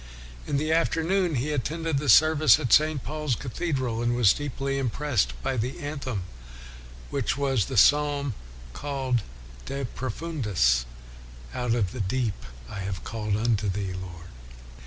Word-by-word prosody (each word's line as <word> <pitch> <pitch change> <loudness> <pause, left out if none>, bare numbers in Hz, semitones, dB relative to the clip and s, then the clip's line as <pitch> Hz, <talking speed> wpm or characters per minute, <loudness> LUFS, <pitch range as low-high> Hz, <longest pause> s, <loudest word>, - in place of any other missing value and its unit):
1 - - -2
In - - +3
the 155 +2 0
afternoon, 165 +1 +1
he 135 +5 -1
attended 155 +2 -1
the 145 -1 -2
service 155 0 +6
at 120 - 0
St. 155 -3 +4
Paul's 150 -3 -2
Cathedral, 130 -2 -2
and 120 0 +1
was 115 -5 +5
deeply 135 -1 -3
impressed 135 -2 0
by 135 - 0
the 120 +4 -2
anthem, 135 -9 -4 0.9
which - - 0
3 - - -6
o8 - - -10
WESLEY 140 -1 0
was 120 -8 +2
the 130 - -4
psalm 145 +1 +4 0.4
called 135 - -1 0.5
De 135 0 -3
Profundis 105 - 0 0.3
" - - -17
Out 125 -1 0
of 100 -6 0
the 125 - -4
deep 115 +2 0 0.3
have 95 +6 -4
I - - -13
called 105 -3 -2
unto 110 -2 +1
thee, 95 -1 -2
Lord." 90 -2 -8
130 Hz, 160 wpm, -26 LUFS, 105-145 Hz, 0.9 s, service